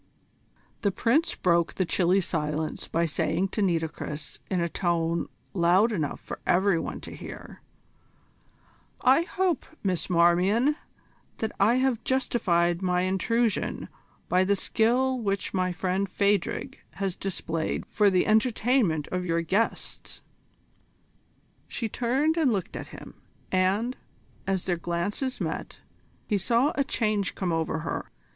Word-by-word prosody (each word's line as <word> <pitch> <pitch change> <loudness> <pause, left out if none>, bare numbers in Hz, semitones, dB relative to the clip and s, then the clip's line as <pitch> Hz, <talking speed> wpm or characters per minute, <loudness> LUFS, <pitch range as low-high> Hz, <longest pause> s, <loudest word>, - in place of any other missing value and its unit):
The 200 - +2
Prince 260 - +2
broke 170 -2 +2
the 185 - +1
chilly 180 +2 +2
silence 155 -2 -2
by 170 +1 +1
saying 175 +4 0
to 210 - -2
Nitocris 160 -5 -2
in 185 - 0
a 170 - +1
tone 170 -1 0 0.3
loud 185 +5 +4
enough 155 -9 -2
for - - -8
every 190 -1 +3
one - - -4
to - - -9
hear: - - -10 1.4
"I 265 +5 +5
hope, 360 -2 0 0.2
Miss 185 -3 -1
Marmion, 180 - +4 0.6
that 220 -1 -2
I 215 +5 +5
have 255 -3 +1
justified 175 -10 +1
my 180 -1 +1
intrusion 215 +4 0 0.4
by 185 +1 +3
the 200 +2 +2
skill 250 +6 +1
which 200 -4 -2
my 185 -1 +1
friend 185 +2 -1
Phadrig 200 -1 0
has 195 -2 -2
displayed 165 -4 -3
for 210 -1 +3
the 185 -2 +2
entertainment 220 - +2
of 180 0 -2
your 170 0 +1
guests?" 205 +7 -2 1.4
She 230 - -3
turned 265 +9 +1
and 300 -6 +3
looked 200 0 -2
at - - -6
him, - - -12 0.3
and, 195 +7 +1 0.5
as 190 -2 0
their 180 -2 0
glances 175 +10 -2
met, - - -4 0.4
he 205 -3 0
saw 235 - +2
a 280 - +1
change 215 -6 0
come 180 -3 -1
over 160 -1 -1
her. 165 - -4
190 Hz, 135 wpm, -27 LUFS, 175-230 Hz, 1.4 s, I